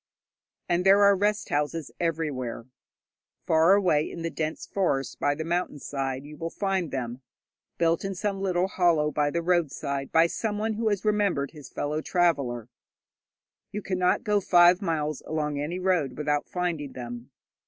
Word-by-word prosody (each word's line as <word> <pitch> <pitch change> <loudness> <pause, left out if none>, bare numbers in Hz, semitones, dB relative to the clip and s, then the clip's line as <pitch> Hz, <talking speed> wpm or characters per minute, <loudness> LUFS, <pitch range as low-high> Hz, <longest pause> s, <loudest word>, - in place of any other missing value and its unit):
And 175 +1 +1
there 195 +2 +6
are 200 0 +6
rest 205 +2 0
houses 150 +1 -1
everywhere. 150 -9 -2 0.8
Far 165 +4 +5
away 170 -7 +2
in 170 - -7
the 165 - -2
dense 155 0 -3
forests 140 -9 -1
by 145 0 0
the 160 - -4
mountain 170 -1 -1
side 135 -1 -4
you 150 +1 -11
will 165 - -4
find 190 -3 -1
them, 125 -1 -4 0.6
built 165 0 +2
in 195 0 -3
some 195 +1 -2
little 185 -1 +1
hollow 170 -5 +2
by 145 -1 +1
the 170 +3 -2
roadside 140 -5 -1
by 165 +1 +5
someone 215 +4 -2
who 220 +1 0
remembered 200 -10 +1
his 145 -5 -12
fellow 150 +2 -2
traveller. 140 - 0 1.0
You 210 0 -5
cannot 180 +1 +1
go 210 -3 +2
five 175 0 +5
miles 155 -5 -1
along 150 -2 -2
any 155 +5 -3
road 180 -9 0
without 150 -1 0
finding 165 -6 -2
them. 120 0 -7
165 Hz, 155 wpm, -27 LUFS, 145-185 Hz, 1.0 s, there